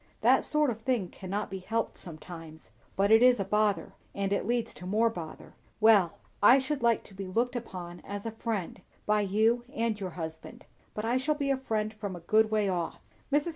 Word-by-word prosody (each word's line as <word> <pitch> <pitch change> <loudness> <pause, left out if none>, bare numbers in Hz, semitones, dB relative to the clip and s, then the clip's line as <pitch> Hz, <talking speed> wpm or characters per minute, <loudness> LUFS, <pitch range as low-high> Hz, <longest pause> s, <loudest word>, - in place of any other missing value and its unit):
"That - - +5
sort 300 -3 +3
of 225 0 -7
thing 225 -7 0
cannot 195 +2 -4
be 190 - -4
helped 225 +4 -2
sometimes, 160 -1 -9 0.2
but 200 +2 +2
it 225 +1 +7
is 250 -2 +6
a 195 - 0
bother, 210 +1 +1 0.2
and 200 0 0
it 200 - -1
leads 240 -1 0
to 180 - -9
more 225 +4 +2
bother. 165 -7 -8 0.3
Well! 210 -6 +5 0.2
I 240 +6 +8
should 275 +1 -2
like 235 -2 +2
to - - -15
be 195 0 -6
looked 235 +7 0
upon 180 -7 -6
as 205 +1 -7
a 225 - -2
friend, 215 -5 -4 0.2
by 210 0 +3
you 220 +4 +2
and 230 -6 -1
your 190 -2 -3
husband; 160 -1 -7 0.3
but 215 - -3
I 240 +3 +2
shall 295 +4 0
be 280 -2 -1
a - - +3
friend 215 -4 -2
a 205 - -2
good 215 +6 +3
way 215 -2 +1
off. 175 -3 -2 0.3
Mrs. 295 +4 +2
215 Hz, 205 wpm, -29 LUFS, 190-235 Hz, 0.3 s, I